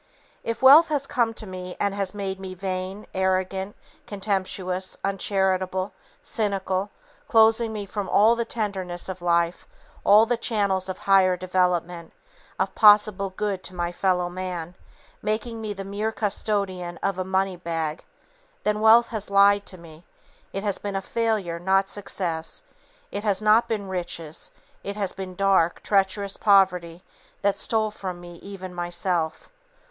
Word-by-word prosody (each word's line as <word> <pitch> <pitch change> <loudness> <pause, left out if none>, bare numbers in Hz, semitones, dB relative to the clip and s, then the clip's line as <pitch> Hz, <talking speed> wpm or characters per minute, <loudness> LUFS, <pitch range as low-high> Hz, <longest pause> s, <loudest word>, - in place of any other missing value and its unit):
If 230 +3 -4
wealth 295 +5 +9
has 290 -3 -1
come 235 -4 +1
to 220 - -8
me 185 -2 -7
and 200 -1 0
has 200 0 -2
made 195 -1 -4
me 190 -1 -7
vain, 185 +2 -4
arrogant, 190 +1 -1 0.3
contemptuous, 190 -2 -3
uncharitable, 190 -1 0 0.3
cynical, 195 -2 -1 0.4
closing 220 -3 +3
from 200 0 -4
me - - -7
all 220 +3 +5
the 235 - -1
tenderness 190 -6 -3
of 185 -1 -6
life, 170 0 +1 0.4
all 210 +2 +7
the 240 +1 0
channels 200 -5 0
of 185 - -4
higher 190 -2 +4
development, 180 -2 -1 0.4
of - - -1
possible 210 -2 +5
good 195 0 -3
to 185 - -8
my 175 0 -2
fellow 180 -1 +1
man, 180 -2 -5 0.5
making 225 +2 -2
me 215 -1 -4
the 195 -1 -5
mere 205 +3 -2
custodian 195 -5 -2
of 195 -1 -1
a - - 0
money 190 0 0
bag, 165 -2 -3 0.6
then, 210 0 0
wealth 225 +2 +6
has 215 -3 -4
lied 200 0 +4
to 185 - -8
me, 165 -1 -14 0.5
it 195 - -4
has 205 -3 -1
been 200 -1 -3
failure, 205 -5 -1
not 190 +2 +2
success; 170 -5 -2 0.5
it 205 - -4
has 200 -3 +2
not 215 +2 +4
been 210 -3 -3
riches, 175 -4 -5 0.3
it 200 - -5
has 200 -3 -2
been 190 -2 -7
dark, 190 -3 +2
treacherous 200 0 +1
poverty 180 -4 +3 0.4
that 200 0 +3
stole 220 -1 +1
from 185 -4 -6
me 175 -1 -11
even 190 -1 -9
Myself." 175 -2 -2
195 Hz, 150 wpm, -24 LUFS, 180-205 Hz, 0.6 s, wealth